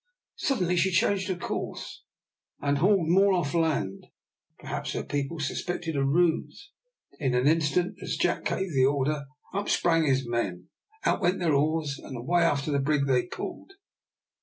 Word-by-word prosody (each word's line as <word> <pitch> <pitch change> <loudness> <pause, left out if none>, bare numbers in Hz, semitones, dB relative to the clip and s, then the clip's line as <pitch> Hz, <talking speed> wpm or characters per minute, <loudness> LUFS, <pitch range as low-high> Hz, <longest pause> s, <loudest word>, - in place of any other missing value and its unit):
Suddenly 180 - 0
she 190 +2 +3
changed 190 +1 +1
her 185 - -1
course, 175 - -5 0.6
and 140 0 0
hauled 185 -1 +3
more 195 +3 +5
off 170 -6 0
the 170 - +1
land. 140 -12 -1 0.5
Perhaps - - -5
her - - -2
people 145 +3 -3
suspected 165 +2 -3
a 140 - +1
ruse. 170 - 0 0.5
In 130 -4 0
an 125 +1 +2
instant, 160 +3 +2
as - - -3
Jack - - 0
gave 190 -3 -1
the 130 -1 +4
order, 140 +1 0 0.3
up 200 +1 -2
sprang 165 -2 +3
his 130 -2 +1
men, 95 -7 -2 0.4
out - - +2
went 180 0 +2
their 170 -4 +1
oars, 150 0 0
and 130 - -8
away 170 +9 +1
after 150 -3 +1
the 140 - +2
brig 140 0 +1
they 130 +2 +2
pulled. 390 - -7
155 Hz, 165 wpm, -27 LUFS, 140-175 Hz, 0.6 s, more